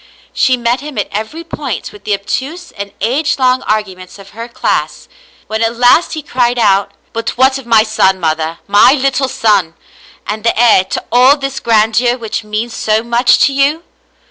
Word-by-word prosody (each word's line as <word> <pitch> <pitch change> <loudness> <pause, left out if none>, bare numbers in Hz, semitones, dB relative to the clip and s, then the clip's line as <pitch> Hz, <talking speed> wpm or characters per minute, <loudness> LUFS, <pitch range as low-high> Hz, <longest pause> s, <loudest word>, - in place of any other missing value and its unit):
She 255 -1 +2
met 240 +1 0
him 295 -3 -8
at 205 - -2
every 220 +11 -5
point 290 -7 -6
with 205 -1 -15
the 210 - +1
obtuse 280 - -5
and 200 0 -7
age 285 +7 0
long 255 -1 +2
arguments 190 -4 -4
of 195 0 -14
her 230 +2 -8
class. 235 - -3 0.4
When 220 +1 -4
at 225 +1 0
last 245 +8 +3
he 310 -2 -5
cried 245 -3 0
out, 200 -3 +2
" - - -40
But 230 +1 -4
what 265 +1 +3
of 255 - -13
my 225 -2 +5
son, 190 -4 +1
mother, 160 0 -2
my 205 +6 +5
little 270 -1 0
son, 205 -9 +1 0.5
and 210 +1 -5
the 230 - 0
heir 225 -6 +5
to - - -4
all 255 +4 +5
this 275 -1 -4
grandeur 230 +2 +2
which 225 -2 -5
means 215 +2 -4
so 215 +1 0
much 235 +1 +3
to 275 - 0
you 285 +4 +1
235 Hz, 190 wpm, -13 LUFS, 210-265 Hz, 0.5 s, my